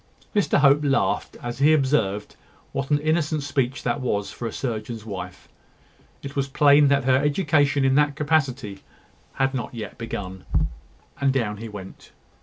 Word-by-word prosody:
Mr 205 - +3
Hope 145 +1 +5
laughed 140 -1 0
as 120 +1 -5
he 150 +3 +5
observed 130 -9 0 0.4
what 135 0 -3
an 145 - +4
innocent 155 0 0
speech 135 -3 -1
that 125 +3 -1
was 105 -5 -1
for 120 - -5
a - - -4
surgeon's 110 -2 -4
wife. 100 -4 -7 0.8
It 140 0 -7
was 140 -1 0
plain 145 +1 +5
that 140 -1 +3
her 130 0 +4
education 145 -2 +2
in 135 - +3
that 145 0 +3
capacity 135 -9 -1 0.5
had 135 0 0
not 125 -1 -4 0.2
begun. 95 -5 -6 0.8
And 140 -1 +3
down 115 -6 -1
he 115 +2 -7
went. 100 -3 -11
135 Hz, 155 wpm, -24 LUFS, 115-145 Hz, 0.8 s, Hope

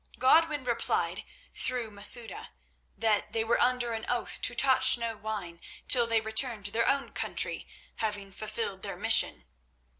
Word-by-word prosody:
Godwin 295 +2 +2
replied 240 -2 -2 0.3
through 245 -3 -3
Masouda 210 +3 +1 0.5
that 215 -1 -1
they 225 -1 0
were 230 +1 -1
under 245 -1 0
an 220 0 -6
oath 245 -1 -3
to 240 - 0
touch 260 -1 +5
no 230 -1 -5
wine 205 -6 -7 0.3
till 240 -2 +5
they 230 -1 +1
returned 220 -1 +1
to 205 - -1
their 230 +2 -1
own 275 0 -2
country, - - -1 0.3
having 205 -3 -4
fulfilled 215 -1 -3
their - - -6
mission. - - +4
230 Hz, 150 wpm, -27 LUFS, 215-250 Hz, 0.5 s, touch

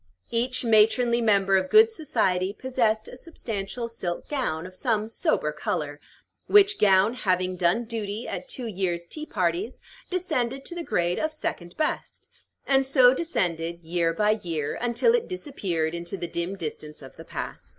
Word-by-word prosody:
Each 245 +2 0
matronly 235 +2 +4
member 195 -3 +4
of 185 0 -1
good 440 +1 +8
society 195 - 0
possessed 225 -3 0
a - - -9
substantial 235 -6 -5
silk 180 -7 -5
gown 245 - -2
of 185 - -9
some 215 +2 0
sober 150 -8 0
color, 150 -1 -3 0.5
which 410 0 +5
gown, 195 +2 +5
having 185 -5 0
done 180 +6 +2
duty 220 -1 -4
at - - -5
two 260 - -4
years' 180 -5 -2
tea 305 - -7
parties, 185 +4 -1 0.3
descended 270 -8 -1
to - - -4
the 345 -1 -4
grade 175 - 0
of 315 - 0
"second 175 - -5
best," 310 - -3 0.4
and 270 -1 +3
so 260 -2 +6
descended, 170 - -2
year 165 0 0
by 210 +5 +2
year, 160 -4 -2
until 245 - +2
it 480 -1 +1
disappeared 190 - -2
into 170 +3 -4
the 175 - -4
dim 170 +3 -3
distance 150 -3 -6
of 130 - -12
the - - -10
past. - - -7
210 Hz, 160 wpm, -26 LUFS, 175-255 Hz, 0.5 s, good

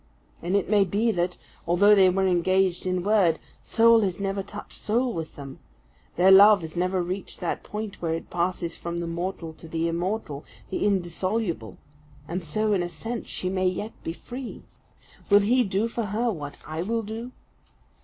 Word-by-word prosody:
And 175 +3 -1
it 200 - +1
may 205 0 +4
be 205 +5 +1
that, 175 -2 -1 0.3
although 195 +5 +5
they 190 -2 +6
were 190 +1 +1
engaged 185 0 +2
in 185 -1 0
word, 195 -6 +3 0.2
soul 230 0 +5
has 190 -3 -1
never 195 0 -1
touched 205 +2 -9
soul 240 +3 0
with 160 -4 -5
them; 140 -2 -9 0.6
their 185 +2 +5
love 200 +1 +8
has 160 0 -8
never 180 +1 0
reached 185 +2 -5
that 175 - -2
point 210 -1 -6
where 165 -1 0
it 165 - -8
passes 175 -1 -1
from 170 0 -4
the 170 - -2
mortal 170 -1 -4
to 165 - -12
the 165 +1 -1
immortal, 170 -3 -3 0.3
the - - 0
indissoluble: 185 - -1 0.5
and 175 +3 -3
so, 215 +7 0
in 190 - +2
a 175 - -2
sense, 230 +5 -5
she 185 - -3
may 185 0 +1
be 180 - -4
yet 205 -5 -6
free. 250 0 -8 0.7
Will 205 0 +7
he 245 +5 +3
do 200 +2 0
for 230 -1 -3
her 225 +4 0
what 145 -6 -7
I 155 +1 -4
will 225 +5 -1
do? 225 +4 -6
185 Hz, 185 wpm, -26 LUFS, 170-210 Hz, 0.7 s, love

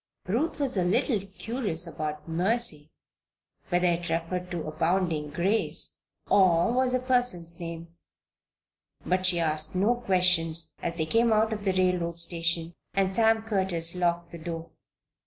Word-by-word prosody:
Ruth 250 - -1
was 265 -6 +2
a 185 - +2
little 205 +5 +1
curious 200 -2 -1
about 155 -2 -6
"Mercy" 175 -2 +1 0.8
whether 175 +1 +1
it 175 0 0
referred 180 +2 -3
to 175 -3 -4
abounding 160 0 -1
grace, 185 +9 -1 0.3
or 185 +1 +3
was 255 0 +1
a - - +1
person's 245 -10 +1
name. 170 0 -8 1.1
But 185 +1 +1
she 175 -2 +3
asked 155 0 0
no 200 +6 +2
questions 180 -7 +1
as 170 - -3
they 160 -2 -1
came 230 +7 +2
out 220 0 +2
of 210 -1 -6
the 190 - +1
railroad 180 -2 0
station 170 0 +1 0.2
and 195 -1 +1
Sam 225 +1 +2
Curtis 190 -6 +1
locked 175 -1 -1
the 170 - -9
door. 165 0 -7
180 Hz, 145 wpm, -27 LUFS, 165-205 Hz, 1.1 s, or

